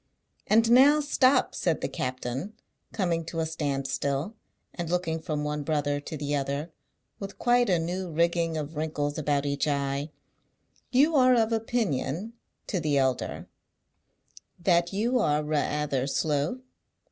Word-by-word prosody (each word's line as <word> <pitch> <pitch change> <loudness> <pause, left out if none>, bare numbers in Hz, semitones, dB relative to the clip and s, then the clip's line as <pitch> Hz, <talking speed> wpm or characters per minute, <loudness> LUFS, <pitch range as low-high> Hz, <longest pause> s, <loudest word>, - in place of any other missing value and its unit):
"And 225 +2 +4
now 280 +5 +7
stop!" 275 -3 +3
said 165 -3 -1
the - - -1
captain, 130 - -4 0.4
coming 175 -5 -1
to 165 0 -5
a 160 - +1
standstill, 140 +2 -2 0.4
and 170 -2 -4
looking 170 -2 -1
from 155 -2 -3
one 150 0 -2
brother 145 -1 0
to 155 +2 -7
the 145 0 -2
other, 140 +3 -2 0.5
with 195 0 -7
quite 245 -1 +3
a 180 - +4
new 175 +3 -3
rigging 170 0 +1
of 155 +1 -5
wrinkles 150 -1 -2
about 145 -1 0
each 140 +1 -1
eye; 140 0 -1 0.8
"you 290 +5 +4
are 255 -2 +6
of 225 -1 +2
opinion," 220 - -1 0.3
to 185 - -2
the 150 -3 +1
elder, 130 -2 -1 1.1
"that 175 -1 +2
you 235 +6 +1
are 150 -7 +1
ra'ather 150 -3 -1
slow?" 145 - 0
160 Hz, 140 wpm, -27 LUFS, 145-200 Hz, 1.1 s, now